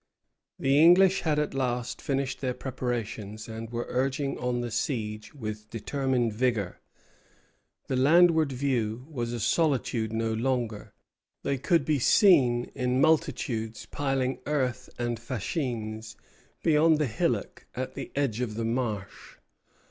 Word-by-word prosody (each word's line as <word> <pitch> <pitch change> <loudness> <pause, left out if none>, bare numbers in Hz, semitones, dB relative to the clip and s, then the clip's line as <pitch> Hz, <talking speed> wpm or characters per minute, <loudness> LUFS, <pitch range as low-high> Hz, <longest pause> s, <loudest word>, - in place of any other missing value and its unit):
The 135 +2 +3
English 180 +3 +6
had 155 -3 +1
at 150 0 0
last 125 -2 -2
finished 135 -1 -2
their 130 -2 -1
preparations, 115 -5 -4
and 115 0 -6
were 120 0 -3
urging 135 +2 -1
on 125 -1 -1
the 120 -1 -4
siege 110 -2 -3
with 110 -4 -6
determined 125 0 -1
vigor. 110 -5 -1 1.1
The 130 - -1
landward 160 +2 +5
view 125 -3 -1
was 120 -5 -3
a 120 - -3
solitude 125 - +1
no 115 0 -1
longer. 115 -2 -2 0.5
They 140 -2 -1
could 165 +5 +2
be 150 -3 +1
seen 130 - +4
in 125 0 0
multitudes 135 -8 +1
piling 135 -3 -1
earth 135 -4 -1
and 120 -1 -2
fascines 115 - -4 0.5
beyond 160 0 +4
the 150 - +1
hillock 110 -4 -2
at 130 +1 -4
the - - -7
edge 130 -5 0
of 110 -4 -2
the 115 0 -2
marsh. 115 -4 -3
125 Hz, 135 wpm, -28 LUFS, 115-140 Hz, 1.1 s, English